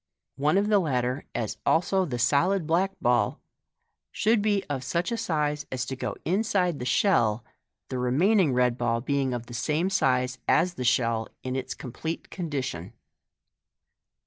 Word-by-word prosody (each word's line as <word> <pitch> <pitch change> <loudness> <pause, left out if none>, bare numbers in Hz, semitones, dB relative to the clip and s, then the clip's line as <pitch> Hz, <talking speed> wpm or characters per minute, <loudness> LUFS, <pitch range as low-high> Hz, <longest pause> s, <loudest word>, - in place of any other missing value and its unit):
One 150 +6 +2
of 200 +1 +2
the 210 -1 +4
latter, 130 -4 -1
as 115 -3 -3
also 185 +3 +2
the 130 -7 -3
solid 155 +10 +2
black 180 +5 +1
ball, 120 -4 +2 0.7
should 220 0 +2
be 205 -2 +1
of 135 -3 -3
such 170 - -1
a - - 0
size 150 -8 -1
as 130 -1 -2
to 130 - -4
go 125 -5 -4
inside 185 -3 +1
the 125 - -4
shell, 120 - +2 0.4
the 130 - -3
remaining 160 - +3
red 125 -1 +1
ball 115 -1 +1
being 135 +1 0
of 120 -1 -4
the 120 - -11
same 155 +10 0
size 130 -6 +1
as 175 +3 +3
the 130 - -5
shell 115 -2 +1
in 130 0 -3
its 130 - -4
complete 160 +6 -6
condition. 135 - -4
140 Hz, 160 wpm, -27 LUFS, 125-180 Hz, 0.7 s, the